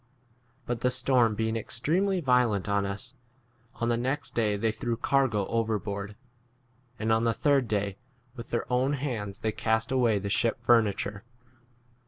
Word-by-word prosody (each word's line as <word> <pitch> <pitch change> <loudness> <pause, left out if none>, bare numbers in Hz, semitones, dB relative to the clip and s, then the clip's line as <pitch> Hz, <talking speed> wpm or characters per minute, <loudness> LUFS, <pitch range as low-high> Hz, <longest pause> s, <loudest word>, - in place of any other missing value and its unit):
But 120 -1 -2
the 125 - +2
storm 125 -3 +2
being 110 +1 -1
extremely 175 - 0
violent 125 - +2
on 100 -1 +1
us, 105 +6 -6 0.6
on 115 - -2
the 120 - +2
next 130 +5 -2
day 105 -3 +1
they 110 +2 +1
threw 120 +1 -3
cargo 125 -6 +1
over 115 0 0
19 105 - -4
board, 100 0 -5 0.8
and 110 +1 -1
on 110 +1 +3
the 115 -1 +1
third 140 -4 +2
day 100 -2 -2 0.4
with 120 -2 -8
their 115 - -1
own 130 +3 +2
hands 120 -8 -4
they 110 - 0
cast 110 +2 0
away 125 -4 +3
20 100 - +1
the 100 - -2
ship 115 +2 +2
furniture. 105 -3 +2
115 Hz, 170 wpm, -28 LUFS, 105-125 Hz, 0.8 s, on